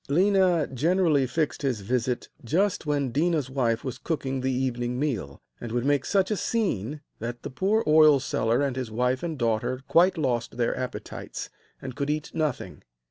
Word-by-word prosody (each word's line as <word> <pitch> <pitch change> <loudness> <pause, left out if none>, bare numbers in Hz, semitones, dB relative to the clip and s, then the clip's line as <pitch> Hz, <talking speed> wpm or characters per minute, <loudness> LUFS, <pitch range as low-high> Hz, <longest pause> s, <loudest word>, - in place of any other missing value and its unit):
Léna 180 -2 +3
generally 155 -1 +2
fixed 155 +3 -1
his 130 -7 -1
visit 125 +3 -1 0.2
just 170 - 0
when 140 -4 0
Déna's 150 -2 +1
wife 120 -4 0
was 130 - -5
cooking 135 -5 -2
the 130 +1 0
evening 125 -1 -1
meal, 110 - -3 0.2
and 120 - -6
would 120 +1 -1
make 145 -2 +2
such 195 0 +1
a 210 - +1
scene 150 - -1 0.2
that 120 +2 -5
the - - -5
poor 200 - +1
oil 155 -2 +6
seller 120 +1 0
and 135 -3 -1
his 130 -3 -3
wife 125 +3 0
and 165 -3 -3
daughter 115 +2 0
quite 180 +2 +4
lost 120 -6 -1
their 120 -1 +1
appetites, 130 0 -6 0.3
and 130 -2 -6
could 140 0 -2
eat 150 0 -2
nothing. 155 -5 -2
135 Hz, 175 wpm, -26 LUFS, 125-160 Hz, 0.3 s, oil